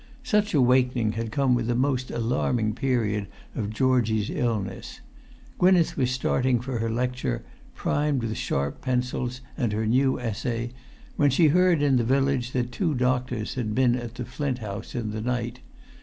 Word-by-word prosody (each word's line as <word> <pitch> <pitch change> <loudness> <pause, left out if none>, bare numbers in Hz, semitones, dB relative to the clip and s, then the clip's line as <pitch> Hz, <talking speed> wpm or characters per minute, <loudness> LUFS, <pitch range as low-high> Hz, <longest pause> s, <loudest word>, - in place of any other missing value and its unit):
Such 210 -6 +1
awakening 125 -4 +3
had 115 0 -4
come 135 0 +2
with 120 -2 0
the 120 - +1
most 130 0 0
alarming 115 -1 0
period 105 -5 0 0.3
of 105 -3 -3
Georgie's 110 -3 +1
illness. 115 - -3 0.6
Gwynneth 180 -2 +4
was 130 -2 +1
starting 125 0 +1
for 125 0 -4
her 115 0 -1
lecture, 125 - -2 0.3
primed 145 -3 0
with 110 -1 -2
sharp 70 +1 -2
pencils 125 0 -2
and 120 -7 0
her 110 +1 -1
new 130 +4 +2
essay, 120 0 -3 0.5
when 145 - +4
she 150 +4 +4
heard 180 -1 +4
in 135 -3 +4
the 120 - +2
village 135 0 +1
that 125 -1 -1
two 165 0 0
doctors 125 -3 0
had 110 -5 -2
been 125 -2 +4
at 120 -1 -6
the 125 -1 -5
Flint 130 +1 -2
House 105 -2 -6
in 115 -3 -2
the 110 0 -4
night. 120 +1 -2
125 Hz, 165 wpm, -26 LUFS, 115-130 Hz, 0.6 s, Gwynneth